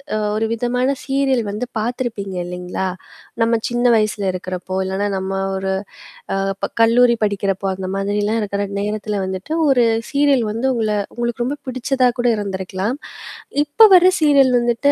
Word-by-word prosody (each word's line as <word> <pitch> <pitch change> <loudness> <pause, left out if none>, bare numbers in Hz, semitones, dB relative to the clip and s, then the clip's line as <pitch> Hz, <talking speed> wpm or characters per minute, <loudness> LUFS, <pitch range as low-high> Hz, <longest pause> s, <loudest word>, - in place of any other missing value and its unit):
அ - - +1 0.2
ஒரு 220 +1 0
விதமான 250 +3 0 0.2
சீரியல் 270 -3 +1
வந்து 215 +4 -3
பார்த்துருப்பீங்க 220 -5 -3
இல்லேங்களா! 180 +1 -4 0.5
நம்ம 230 0 +3
சின்ன 240 +1 -1
வயசுல 215 -1 0
இருக்கிறப்போ, 185 0 -5
இல்லன்னா 195 +2 -1
நம்ம 190 0 -4 0.3
ஒரு 190 0 -2 0.6
அ - - 0 0.3
ப - - +1 0.2
கல்லூரி 235 +1 +5
படிக்கிறப்போ, 195 -1 -1
அந்த 185 0 -5
மாதிரிலாம் 205 +3 0
இருக்கிற 200 -1 -2 0.2
நேரத்தில 210 0 -2
வந்துட்டு, 190 +11 -4 0.2
ஒரு 245 -3 +4 0.3
சீரியல் 280 -4 +3
வந்து 230 +5 -1
உங்கள 220 -3 -1 0.3
உங்களுக்கு 240 0 -2
ரொம்ப 285 +4 -2
பிடிச்சதா 255 0 +1
கூட 245 - +2
இருந்திருக்கலாம். 195 +3 -3 0.7
இப்ப 420 +10 +6
வர 360 0 +6 0.2
சீரியல் 280 -4 +5
வந்துட்டு 240 +4 +2
225 Hz, 145 wpm, -19 LUFS, 195-250 Hz, 0.7 s, இப்ப